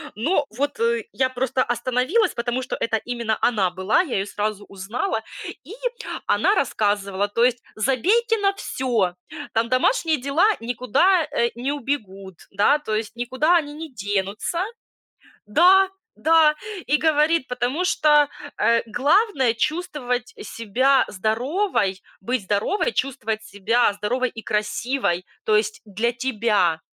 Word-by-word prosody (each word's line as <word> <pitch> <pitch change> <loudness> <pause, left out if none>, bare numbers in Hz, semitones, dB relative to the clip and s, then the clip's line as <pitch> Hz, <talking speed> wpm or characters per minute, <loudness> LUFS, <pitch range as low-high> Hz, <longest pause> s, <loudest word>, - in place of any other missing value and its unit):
Но 290 - +1
вот, 285 - -3
э, 460 -1 +1
я 260 -1 +1
просто 260 0 -1
остановилась, 255 - +1
потому 240 +2 -2
что 255 - -4
это 225 - 0
именно 235 -1 -2
она 210 -6 +2
была, 190 - +2
я 315 -9 -3
её 195 - 0
сразу 210 0 -3
узнала, 220 - -3 0.4
и 380 - -10 0.5
она - - +3
рассказывала, 205 -1 0
то 230 +3 +1
есть: 245 -1 +1
"Забейте 390 - +2
на 395 -1 +2
всё, 235 - -1 0.4
там 225 +1 +1
домашние 315 - +2
дела 280 +9 +2 0.2
никуда, 255 - +2
э, 235 - +1
не 250 +4 -2
убегут, 200 -9 -4 0.2
да, 205 +9 +3
то 220 -7 -3
есть 220 +1 -3
никуда 260 +8 +2
они 295 -3 -3
не 315 0 -8
денутся". 205 - -2 0.8
Да, 370 - +5 0.3
да. 320 -1 +4 0.3
И 295 - +3
говорит, 315 -1 +2
потому 250 +8 -1
что, 295 -4 +4 0.3
э, 230 +2 +3
главное- 280 - +2
чувствовать 250 -3 -2
себя 245 +6 +1
здоровой, 220 - -1 0.2
быть 240 +2 -2
здоровой, 210 - 0
чувствовать 225 -5 -2
себя 220 +3 +1
здоровой 240 +5 -1
и 225 - -9
красивой, 215 -3 -1 0.2
то 215 - +2
есть 215 0 0
для 220 +3 -1
тебя. 215 -9 +1
245 Hz, 135 wpm, -23 LUFS, 215-295 Hz, 0.8 s, Да